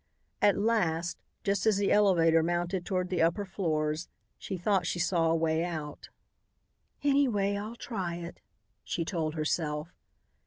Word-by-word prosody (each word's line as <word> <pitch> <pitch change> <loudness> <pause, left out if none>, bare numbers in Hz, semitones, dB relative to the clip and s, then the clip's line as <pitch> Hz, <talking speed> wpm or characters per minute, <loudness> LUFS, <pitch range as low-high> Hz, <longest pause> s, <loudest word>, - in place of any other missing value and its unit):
At 205 - +4
last, 175 -6 0 0.2
just 200 0 0
as 215 -3 +4
the 200 0 +1
elevator 170 -6 +5
mounted 175 +2 -1
toward 185 -2 -1
the 180 -3 0
upper 170 +5 +2
floors, 155 -4 -1 0.3
she 190 - -4
thought 180 -1 +1
she - - -1
saw 170 -1 +2
a 165 - +3
way 160 0 +1
out. 155 -4 -5 0.9
"Anyway, 245 -9 +2
I'll 210 +3 -5
try 190 -8 -4
it," 170 0 -8 0.4
she 165 - -2
told 160 -3 -2
herself. 155 0 -2
175 Hz, 145 wpm, -30 LUFS, 165-200 Hz, 0.9 s, elevator